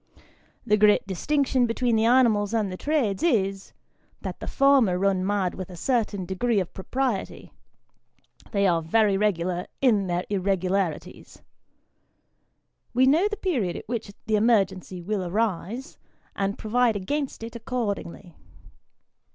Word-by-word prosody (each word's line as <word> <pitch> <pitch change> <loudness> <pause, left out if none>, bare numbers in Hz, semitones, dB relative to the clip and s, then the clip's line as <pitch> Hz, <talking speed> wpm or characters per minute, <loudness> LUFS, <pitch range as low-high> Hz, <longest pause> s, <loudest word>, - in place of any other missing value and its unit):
The 210 -2 +3
great 210 0 +4
distinction 255 - +1
between 235 0 0
the 220 0 +2
animals 230 -4 +3
and 210 -4 0
the - - -4
trades, 260 -4 -1
is, 195 - 0 0.5
that - - -6
the - - -7
former 270 -10 +3
run 190 -1 +1
mad 195 -2 0
with 185 -1 -7
a 180 - -9
certain 210 -2 -1
degree 200 +5 0
of 185 - -4
propriety 245 +1 -3 1.0
they 200 -2 +1
are 170 -3 +2
very 205 +5 +2
regular 185 -3 0
in 215 -7 +3
their 175 0 -1
irregu 190 -2 -1
larities. 190 -6 -3 1.5
We 255 +1 +5
know 315 +9 +4
the 420 0 -4
period 255 - -1
at - - -8
which 225 -2 -4 0.2
the 215 -1 +2
emergency 190 -5 +1
will 200 +1 -2
arise, 215 - -3 0.4
and 200 +1 -2
provide 230 +1 +1
against 265 +6 -3
it 230 +1 -8
accordingly. 205 - -4
205 Hz, 135 wpm, -25 LUFS, 190-245 Hz, 1.5 s, We